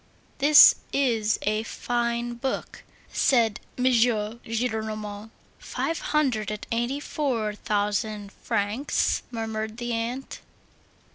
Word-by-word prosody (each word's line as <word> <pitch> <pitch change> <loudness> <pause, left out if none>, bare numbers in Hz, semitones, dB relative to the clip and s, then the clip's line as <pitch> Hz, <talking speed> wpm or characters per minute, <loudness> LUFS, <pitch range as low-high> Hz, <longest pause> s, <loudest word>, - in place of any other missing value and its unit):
"This 295 +1 +9 0.2
is 230 -6 +1
a 215 +1 +1
fine 240 +1 -2
book," 260 +3 -4 0.3
said 230 -5 +3 0.2
M. 250 - -2
Gillenormand. 220 -2 -1 0.3
"Five 330 - -3
hundred 255 -9 0
and 210 0 -5
eighty 240 +4 -1
four 250 -8 -2
thousand 210 0 -2
francs!" 225 +6 -1
murmured 220 -1 -4
the 240 -1 -3
aunt. 235 +4 -4
230 Hz, 95 wpm, -26 LUFS, 215-245 Hz, 0.3 s, This